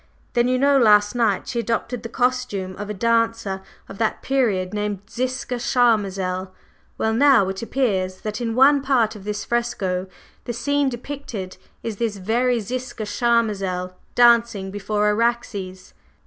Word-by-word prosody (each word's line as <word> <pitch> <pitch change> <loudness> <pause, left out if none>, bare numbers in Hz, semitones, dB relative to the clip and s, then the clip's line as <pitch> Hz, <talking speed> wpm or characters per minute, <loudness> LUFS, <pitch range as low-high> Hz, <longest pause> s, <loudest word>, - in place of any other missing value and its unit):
Then 240 0 +3
you 255 0 +2
know 280 +1 +4
last 210 -2 +5
night 230 -5 +1
she 240 - -2
adopted 235 +1 -2
the 230 - -7
costume 245 -7 -1
of 205 - -6
a - - -2
dancer 230 -3 0 0.3
of 195 - -11
that 220 -1 -1
period, 210 -9 0
named 205 -2 -2
Ziska 255 +1 -3
Charmazel. 195 -7 +1 0.5
Well, 220 - 0
now 260 -5 +5
it 190 0 -4
appears 195 -7 -1
that 215 +1 -4
in 230 -1 -2
one 275 +2 +6
part 245 -5 +1
of 200 -2 -11
this 210 0 -3
fresco 205 -6 -1 0.4
the 240 - -3
scene 285 +3 +1
depicted 240 -7 -6 0.3
is 225 -3 -4
this 225 -2 -2
very 235 +5 +1
Ziska 250 +1 -5
Charmazel 205 -5 0 0.2
dancing 235 -5 +4
before 205 +1 -1
Araxes." 210 -4 -1
230 Hz, 150 wpm, -22 LUFS, 200-245 Hz, 0.5 s, one